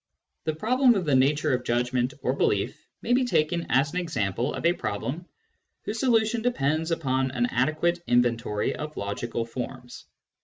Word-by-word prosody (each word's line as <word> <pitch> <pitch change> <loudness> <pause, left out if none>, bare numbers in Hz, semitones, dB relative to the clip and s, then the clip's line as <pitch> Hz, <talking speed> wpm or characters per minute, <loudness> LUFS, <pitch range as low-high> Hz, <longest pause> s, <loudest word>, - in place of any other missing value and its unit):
The 155 -1 -1
problem 245 - +3
of 190 -3 -1
the 145 - +1
nature 145 +3 +3
of 125 0 -1
judgment 125 +1 0
or - - +1
belief - - -1 0.2
may 245 - +1
be 255 +1 +4
taken 170 -7 0
as 140 +4 +2
an 180 - 0
example 120 - -1
of - - -5
a 170 - +5
problem 135 - -4 0.6
whose 215 +2 -4
solution 225 -2 +2
depends 160 - 0
upon 135 -5 0
an 120 -2 0
adequate 155 +8 0
inventory 120 -3 +1
of 150 0 -7
logical 115 +3 -3
forms. 125 +1 -7
145 Hz, 160 wpm, -26 LUFS, 125-175 Hz, 0.6 s, a